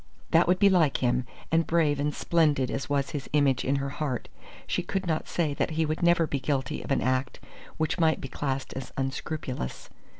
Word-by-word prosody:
That 165 +1 +5
would 180 +1 +4
be 200 - +5
like 170 -7 +4
him; 125 0 +1 0.2
and 165 0 +3
brave 155 -4 +2
and 145 +1 +1
splendid 150 -5 +2
as 135 - -3
was 140 -1 0
his 145 -3 -5
image 140 -3 +3
in 135 - +1
her 140 0 -1
heart, 130 -5 -2 0.4
she - - -1
could 195 -1 -3
not 160 -2 -1
say 160 -4 0
that - - 0
he 160 - +3
would 155 +1 -2
never 170 -1 +4
be 140 -2 -2
guilty 135 -1 -1
of - - -9
an 135 - +2
act 130 +1 0 0.4
which 160 +3 -1
might 160 -1 +3
be - - -5
classed 135 0 -3
as 135 - -6
unscrupulous. 135 - -4
145 Hz, 205 wpm, -27 LUFS, 135-160 Hz, 0.4 s, That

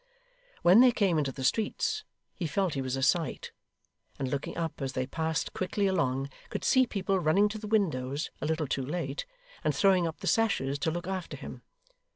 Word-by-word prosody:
When 180 +5 +7
they 255 -1 +7
came 190 -8 +2
into 140 -3 0
the 130 0 -7
streets, 230 - 0 0.3
he 170 - -3
felt 185 +1 0
he 135 - -2
was 130 0 -2
a 135 - -2
sight; 160 +4 +1 0.7
and 135 - -2
looking 140 +4 -3
up 165 -3 -3
as 135 -1 -2
they 130 -1 -1
passed 160 +3 -2
quickly 195 +2 -1
along, 140 -8 0 0.2
could - - -4
see 260 -1 +4
people 195 -2 0
running 180 +5 +4
to 215 +1 -5
the 210 - -7
windows 150 -9 0
a - - -1
little 160 0 0
too 135 0 -1
late, 145 0 -3 0.4
and - - +1
throwing 190 -4 +4
up 160 - -5
the - - -5
sashes 145 -12 +1
to 150 - 0
look 175 +2 -3
after 185 -2 -4
him. - - -9
165 Hz, 195 wpm, -29 LUFS, 140-195 Hz, 0.7 s, When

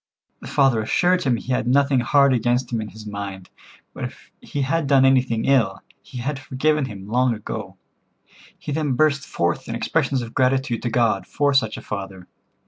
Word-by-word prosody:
The - - -10
father 135 -5 +3
assured 180 +11 +2
him 130 -6 +1
he 130 - -6
had 125 -1 -1
nothing 135 +1 +3
hard 140 +3 +4
against 120 +1 0
him 115 - 0
in 110 - -5
his 105 +2 -12
mind, 100 -3 -7 0.4
but - - -5
if - - -11
he 145 - -3
had 155 +2 0
done 135 -1 +5
anything 130 -4 +2
ill, 115 -8 +2 0.2
he 130 - -11
had 135 +3 -3
forgiven 140 +3 0
him 100 -5 -9
long 125 +2 +2
ago. 105 - -7 0.8
He - - -7
then 145 -2 0
burst 140 +1 +2
forth 85 0 -2
in - - -3
expressions 130 -3 0
of 115 - -9
gratitude 130 -2 +1
to 120 - -2
God 115 -4 +1
for 145 -1 +1
such 110 -5 +1
a - - -9
father. 95 -3 -6
125 Hz, 190 wpm, -22 LUFS, 110-140 Hz, 0.8 s, done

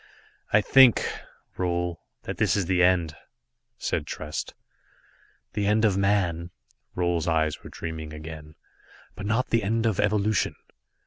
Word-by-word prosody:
"I 105 - +5
think, 130 +1 +6 0.5
Roal, 85 -2 -1 0.2
that - - -5
this - - +2
is 95 - 0
the 90 0 +2
end," 90 -3 +3 0.6
said - - -2
Trest. 75 0 -5 1.0
"The 105 -1 -1
end 110 +2 +3
of 100 -3 +3
man." 95 -4 +1 0.5
Roal's 85 -2 0
eyes 80 -2 0
were - - -9
dreaming 80 -2 -6
again. 75 0 -9 0.6
"But 100 - -6
not 115 +4 0
the 115 - +3
end 110 +3 0
of 110 -4 +1
evolution. 105 -1 +1
90 Hz, 135 wpm, -26 LUFS, 80-105 Hz, 1.0 s, think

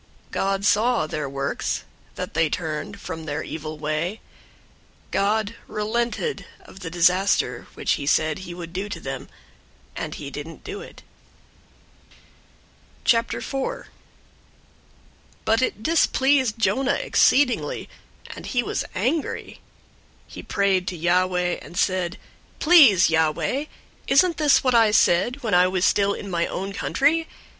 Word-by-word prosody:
003:010 - - -30
God 195 0 -1
saw 225 -1 +3
their 150 -2 -4
works, 140 0 -2 0.3
that - - -5
they 160 0 +2
turned 175 +6 -4
from 160 -4 -7
their 150 0 -3
evil 155 0 -6
way. 155 +7 -2 0.9
God 210 +2 +1
relented 235 - -2
of 190 - -14
the 180 -4 -6
disaster 180 -7 +2
which - - -1
he 140 - -1
said 155 +3 +2
he 175 -2 -8
would 170 -1 -8
do 195 +3 -3
to 175 - -5
them, 135 -3 -6 0.7
and - - -5
he 140 -2 -7
didn't 150 +3 -8
do 410 +1 -6
it. 485 - -13 2.0
004:001 270 - 0 1.6
But 225 +2 +3
it 220 -4 -1
displeased 265 -6 +2
Jonah 265 +4 +1
exceedingly, 285 - +2 0.5
and - - -9
he 245 -2 0
was - - -2
angry. 255 - -2 0.7
004:002 - - -16
He - - -7
prayed 195 -2 +1
to 180 - -3
Yahweh, 180 +1 +1
and 175 - -11
said, 185 -2 0 0.4
"Please, 265 - +6
Yahweh, 160 - +1 0.4
wasn't 335 +3 +4
this 295 -2 +4
what 255 -1 +2
I 225 -2 +5
said 235 +6 +2
when 220 -3 -1
I 180 +1 +6
was 185 0 0
still 200 0 +2
in 200 - -7
my 170 -1 0
own 195 +2 -4
country? 305 +9 +1
195 Hz, 135 wpm, -23 LUFS, 170-245 Hz, 2.0 s, Please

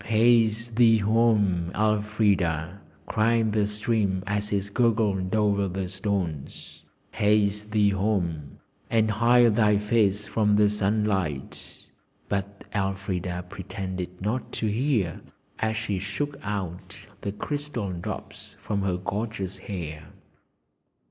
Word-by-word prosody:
'Haste 115 0 +3
thee 115 -2 +6
home, 105 -5 +2
Elfrida!' 105 -5 +1 0.2
cried 115 0 +2
the 105 -1 +1
stream 105 -3 0
as 105 +1 -1
it 100 0 -1
gurgled 105 -5 +1
over 100 -2 +2
the 95 0 -3
stones; 95 -6 -4 0.3
'haste 105 0 +1
thee 105 -1 +3
home, 90 -8 -1 0.3
and 110 -1 +2
hide 120 +1 +4
thy 105 -2 +4
face 105 -1 +1
from 105 -1 +2
the 105 0 +4
sunlight.' 100 -8 -2 0.4
But 100 0 -3
Elfrida 95 -3 -2
pretended 95 -1 -6
not 110 +6 -2
to - - -2
hear 110 - 0 0.4
as 110 0 0
she 105 -4 -2
shook 100 +10 -3
out 95 -4 -5 0.2
the 100 - -3
crystal 140 -2 -4
drops 85 -1 -7
from 100 -2 -2
her 95 -2 0
gorgeous 95 -1 -4
hair. 80 -6 -6
105 Hz, 115 wpm, -26 LUFS, 95-110 Hz, 0.4 s, thee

